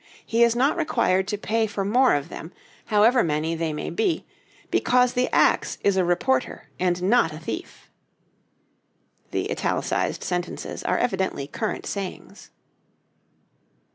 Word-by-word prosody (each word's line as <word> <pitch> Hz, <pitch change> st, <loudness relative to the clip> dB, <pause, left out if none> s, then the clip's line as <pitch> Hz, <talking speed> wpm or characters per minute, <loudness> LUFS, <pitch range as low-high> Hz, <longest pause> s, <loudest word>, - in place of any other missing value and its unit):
He 230 Hz, +1 st, 0 dB
is 235 Hz, 0 st, +5 dB
not 270 Hz, +7 st, +2 dB
required 215 Hz, -, +1 dB
to 210 Hz, 0 st, -2 dB
pay 220 Hz, +2 st, 0 dB
for 200 Hz, -1 st, -3 dB
more 250 Hz, -, +4 dB
of 145 Hz, -1 st, -3 dB
them, 160 Hz, -, -8 dB, 0.3 s
however 225 Hz, +4 st, +4 dB
many 155 Hz, +1 st, -1 dB
they 165 Hz, -1 st, -2 dB
may 150 Hz, -, -4 dB
be, 405 Hz, -6 st, 0 dB, 0.5 s
because 250 Hz, 0 st, +3 dB
the 250 Hz, 0 st, +1 dB
axe -, -, +2 dB
is 200 Hz, -, +3 dB
a 190 Hz, -, +3 dB
reporter, 150 Hz, -5 st, 0 dB
and 180 Hz, -1 st, 0 dB
not 195 Hz, -4 st, +3 dB
a -, -, -7 dB
thief." 250 Hz, -, -7 dB, 1.4 s
[The -, -, -2 dB
italicized -, -, -1 dB
sentences 180 Hz, -1 st, -4 dB
are -, -, +1 dB
evidently 190 Hz, -, -1 dB
current 215 Hz, +9 st, -4 dB
sayings. 195 Hz, -2 st, -6 dB
200 Hz, 140 wpm, -24 LUFS, 175-240 Hz, 1.4 s, is